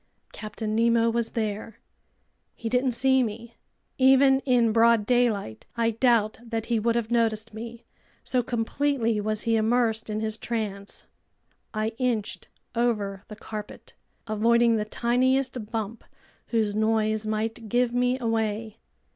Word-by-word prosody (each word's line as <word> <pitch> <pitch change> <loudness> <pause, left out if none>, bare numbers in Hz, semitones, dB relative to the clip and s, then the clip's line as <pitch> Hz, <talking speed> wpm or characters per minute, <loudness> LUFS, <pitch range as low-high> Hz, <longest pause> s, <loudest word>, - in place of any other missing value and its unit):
Captain 215 0 -4
Nemo 230 0 +3
was 235 0 -1
there. 215 0 -3 0.8
He 230 - -4
didn't 250 +1 +1
see 265 +2 +3
me. 230 0 -4 0.5
Even 265 +1 +6
in 240 -3 +4
broad 230 -1 +4
daylight 225 - 0
I 230 0 +2
doubt 225 -2 +2
that 225 -1 -4
he 235 -2 0
would 230 +2 +1
have 235 -1 -1
noticed 225 -2 0
me, 230 +1 -8 0.4
so 255 - +1
completely 235 -1 0
was 215 0 -2
he 230 -1 +2
immersed 225 0 +1
in 215 0 -2
his 220 0 -2
trance. 205 -4 -4 0.7
I 215 0 -1
inched 240 -5 -2 0.3
over 210 -5 -1
the 210 - -9
carpet, 210 0 -9 0.3
avoiding 230 +2 +3
the 210 - -1
tiniest 250 0 0
bump 225 -1 -4 0.4
whose 220 -3 0
noise 215 0 +1
might 220 +1 -3
give 245 +1 +1
me 250 +1 +1
away. 225 -2 -2
225 Hz, 135 wpm, -26 LUFS, 215-240 Hz, 0.8 s, Even